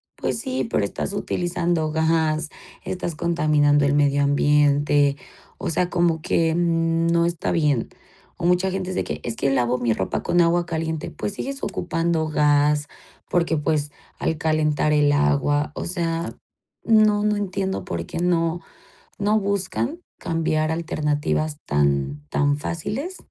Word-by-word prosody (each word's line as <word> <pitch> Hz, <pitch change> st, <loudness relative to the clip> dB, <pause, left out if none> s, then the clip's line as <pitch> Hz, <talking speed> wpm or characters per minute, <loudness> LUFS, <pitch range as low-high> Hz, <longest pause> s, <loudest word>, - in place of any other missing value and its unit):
Pues -, -, -2 dB
sí, 260 Hz, -1 st, -2 dB
pero 105 Hz, -, +1 dB
estás 150 Hz, -, -3 dB
utilizando 175 Hz, -4 st, -1 dB
gas, 160 Hz, -1 st, +1 dB, 0.3 s
estás 175 Hz, -3 st, -4 dB
contaminando 150 Hz, -4 st, +2 dB
el 140 Hz, -, +2 dB
medio 145 Hz, -1 st, +3 dB
ambiente, 145 Hz, 0 st, +3 dB, 0.4 s
o -, -, -3 dB
sea, 175 Hz, +2 st, 0 dB
como 170 Hz, -3 st, +1 dB
que, 165 Hz, 0 st, +1 dB
mm, 165 Hz, -1 st, +1 dB
no 170 Hz, 0 st, +3 dB
está 170 Hz, -1 st, -1 dB
bien. 150 Hz, -8 st, +1 dB, 0.5 s
O 170 Hz, -, -4 dB
mucha 180 Hz, +2 st, +2 dB
gente 185 Hz, -1 st, -3 dB
dice -, -, -1 dB
que -, -, -5 dB
es 115 Hz, -1 st, -3 dB
que 135 Hz, -, 0 dB
lavo 125 Hz, -1 st, +1 dB
mi 120 Hz, -2 st, 0 dB
ropa 95 Hz, -, -2 dB
con 175 Hz, -, +1 dB
agua 170 Hz, +1 st, +2 dB
caliente, 160 Hz, -1 st, -3 dB
pues 205 Hz, -, -4 dB
sigues 275 Hz, +5 st, -5 dB
ocupando 165 Hz, -2 st, -1 dB
gas 150 Hz, -1 st, +2 dB, 0.4 s
porque, 170 Hz, -2 st, +1 dB
pues, 150 Hz, 0 st, 0 dB, 0.3 s
al 160 Hz, -, -1 dB
calentar 155 Hz, -1 st, +1 dB
el 145 Hz, -1 st, +4 dB
agua, 145 Hz, -, +1 dB
o -, -, -4 dB
sea, 170 Hz, -2 st, -2 dB, 0.5 s
no, 215 Hz, -2 st, +4 dB
no 210 Hz, 0 st, +2 dB
entiendo 190 Hz, -1 st, -2 dB
por 85 Hz, 0 st, -4 dB
qué -, -, -5 dB
no 170 Hz, 0 st, +1 dB, 0.6 s
no 210 Hz, +1 st, +2 dB
buscan 200 Hz, -, -2 dB, 0.2 s
cambiar 160 Hz, -1 st, 0 dB
alternativas 155 Hz, -2 st, -1 dB
tan 70 Hz, 0 st, 0 dB
tan 145 Hz, -, +1 dB
fáciles 215 Hz, -, -4 dB
160 Hz, 145 wpm, -23 LUFS, 145-175 Hz, 0.6 s, el